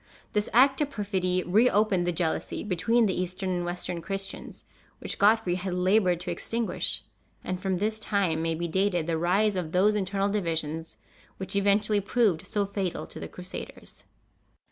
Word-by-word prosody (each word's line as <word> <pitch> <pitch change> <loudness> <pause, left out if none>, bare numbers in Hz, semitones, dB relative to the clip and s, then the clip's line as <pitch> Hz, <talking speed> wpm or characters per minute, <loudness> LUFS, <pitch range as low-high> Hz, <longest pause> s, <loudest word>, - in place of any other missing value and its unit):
This 210 0 0
act 265 +4 +5
of 290 - +1
perfidy 185 -5 0
reopened 205 -2 +3
the - - +2
jealousy 165 -1 -2
between 215 +5 +2
the 190 - +1
Eastern 185 +1 -2
and 175 -1 -1
Western 175 0 -4
Christians, 195 +3 -5 0.3
which - - -4
Godfrey 210 -3 +4
had 180 0 -3
labored 185 -1 +3
to 180 - -4
extinguish; 225 +6 -1 0.4
and 185 0 -3
from 190 -2 0
this 215 +3 -1
time 195 -7 0
may 165 0 0
be 170 +1 -2
dated 180 -1 +1
the 165 -1 -1
rise 195 +5 +2
of 170 -4 -3
those 195 +4 +4
internal 200 0 0
divisions 165 -5 -2 0.4
which 190 +1 -4
eventually 205 +1 +3
proved 200 -5 +1
so 205 -1 0
fatal 195 - -3
to 80 - -10
the 80 - -5
Crusaders. 180 - -9
190 Hz, 165 wpm, -27 LUFS, 175-210 Hz, 0.4 s, act